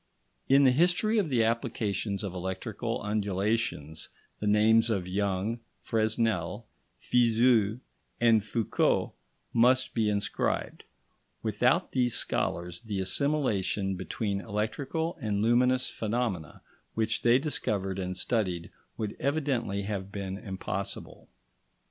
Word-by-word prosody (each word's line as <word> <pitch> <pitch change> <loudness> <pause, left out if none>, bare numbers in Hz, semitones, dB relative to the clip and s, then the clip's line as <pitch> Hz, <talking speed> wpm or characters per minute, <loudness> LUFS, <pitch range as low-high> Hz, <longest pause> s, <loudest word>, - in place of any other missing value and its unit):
In 135 +1 +6
the 130 - +6
history 180 - +3
of 185 -6 0
the 120 -4 +3
applications 110 -3 -1
of 95 -3 -4
electrical 95 +5 -4
undulations, 100 -6 -1 0.3
the 105 - -2
names 110 +2 +4
of 95 -5 -1
Young, 100 +4 -1 0.2
Fresnel, 110 -3 0 0.3
Fizeau, 115 -2 +3 0.4
and 115 -3 +4
Foucault 110 0 0 0.4
must 125 +3 +3
be 110 -2 +1
inscribed; 100 -1 -2 0.6
without 125 - +2
these 125 -3 +1
scholars, 85 +3 -2
the 105 -4 -4
assimilation 100 -4 0
between 100 +2 -3
electrical 135 - -2
and 105 -3 0
luminous 125 +2 +3
phenomena 110 - -3 0.3
which 110 0 0
they 120 +1 +5
discovered 100 - -1
and 90 -1 -3
studied 90 -6 -1 0.3
would 105 -2 -3
evidently 135 -8 -1
have 100 -1 -4
been 95 -2 -4
impossible. 95 -2 -5
110 Hz, 110 wpm, -29 LUFS, 100-120 Hz, 0.6 s, In